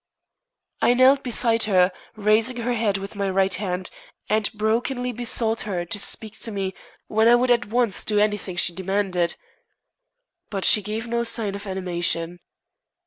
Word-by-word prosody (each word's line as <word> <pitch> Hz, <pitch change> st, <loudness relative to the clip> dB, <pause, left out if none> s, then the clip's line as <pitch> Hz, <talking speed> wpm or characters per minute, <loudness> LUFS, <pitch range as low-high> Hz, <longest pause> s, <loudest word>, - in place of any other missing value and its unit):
I 245 Hz, -, +4 dB
knelt 265 Hz, +2 st, +5 dB
beside 230 Hz, -2 st, +2 dB
her, 185 Hz, -3 st, +3 dB, 0.2 s
raising 215 Hz, +4 st, +2 dB
her 240 Hz, +1 st, -1 dB
head 220 Hz, -4 st, 0 dB
with 195 Hz, +2 st, -8 dB
my 200 Hz, -1 st, -1 dB
right 190 Hz, 0 st, +1 dB
hand, 185 Hz, -2 st, -3 dB, 0.4 s
and 215 Hz, -1 st, +1 dB
brokenly 240 Hz, +4 st, -1 dB
besought 230 Hz, -1 st, 0 dB
her 180 Hz, -5 st, -3 dB
to 175 Hz, +4 st, -1 dB
speak 220 Hz, +2 st, 0 dB
to -, -, -4 dB
me, 195 Hz, -2 st, -3 dB, 0.3 s
when 220 Hz, +1 st, +2 dB
I 240 Hz, -, +7 dB
would 245 Hz, +1 st, +2 dB
at 240 Hz, -2 st, +2 dB
once 230 Hz, -2 st, 0 dB
do 210 Hz, -, -1 dB
anything 210 Hz, -3 st, 0 dB
she 175 Hz, 0 st, +1 dB
demanded. 190 Hz, -2 st, -1 dB, 1.1 s
But 195 Hz, -2 st, -2 dB
she 210 Hz, -, +6 dB
gave 215 Hz, +3 st, -4 dB
no 235 Hz, 0 st, -1 dB
sign 225 Hz, -3 st, -1 dB
of 200 Hz, +1 st, -7 dB
animation. 175 Hz, -2 st, -3 dB
210 Hz, 160 wpm, -23 LUFS, 190-230 Hz, 1.1 s, I